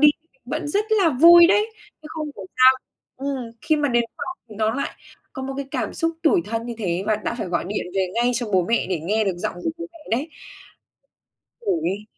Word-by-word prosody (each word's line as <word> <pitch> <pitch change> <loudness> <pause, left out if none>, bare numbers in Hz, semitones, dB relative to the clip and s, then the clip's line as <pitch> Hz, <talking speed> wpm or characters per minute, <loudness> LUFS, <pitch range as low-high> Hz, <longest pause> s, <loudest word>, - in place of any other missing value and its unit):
đi 300 - +8
thì 320 - -41
mình 265 - -36
vẫn 295 +4 -3
rất 410 +8 +1
là 405 -6 +4
vui 340 +5 +8
đấy, 415 +4 +3 0.4
chứ 305 - -10
không 315 -1 -4
hiểu 195 -2 -8
sao 255 0 +8 0.4
ừm, 275 +1 -3 0.2
khi 310 - +2
mà 295 -1 +1
đến 240 -2 +2
phòng 355 - -5
thì 215 - -11
nó 220 +1 +1
lại 280 - -2 0.4
có 265 - -6
một 270 +1 -4
cái 280 - -4
cảm - - -3
xúc 330 -1 0
tủi 340 +2 +4
thân 225 +1 -3
như 240 - -4
thế, 180 -3 -1
và 215 - +2
đã 215 - -3
phải - - -3
gọi 175 0 -1
điện 205 - -3
về 190 -1 +1
ngay 240 +1 +2
cho 240 0 -1
bố 185 -2 +3
mẹ 230 - +2
để 180 -4 -1
nghe 210 +7 0
được 190 -3 -1
giọng - - -3
của - - +1
bố 340 - -5
mẹ 335 - -15 0.2
đấy. 290 +6 -3 1.3
Khổ 390 -7 0
ghê. 200 +2 -2
260 Hz, 240 wpm, -23 LUFS, 215-320 Hz, 1.3 s, đi